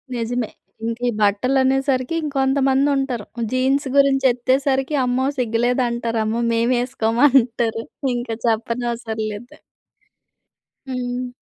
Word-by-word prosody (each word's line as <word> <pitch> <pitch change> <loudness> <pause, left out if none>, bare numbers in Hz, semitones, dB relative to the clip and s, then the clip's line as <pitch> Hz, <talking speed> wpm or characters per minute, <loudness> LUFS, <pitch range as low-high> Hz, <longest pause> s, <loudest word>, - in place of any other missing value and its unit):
నిజమే! 235 0 -2 0.4
ఇంకీ 230 +2 -2
బట్టలనేసరికి 260 +6 +1
ఇంకొంతమందుంటారు. 270 -3 +1 0.3
జీన్స్ 265 +2 +1
గురించి 275 -1 +4
ఎత్తేసరికి 265 +3 0
అమ్మో! 250 +1 0
సిగ్గులేదంటారు. 235 -1 0
అమ్మో! 225 +2 -1
మేమేసుకోమంటారు! 235 0 +2 0.3
ఇంక 240 -1 -4 0.2
చెప్పనవసరం 230 0 -2
లేదు. 225 +4 -10 1.3
హ్మ్. 250 0 -3
245 Hz, 80 wpm, -21 LUFS, 230-265 Hz, 1.3 s, గురించి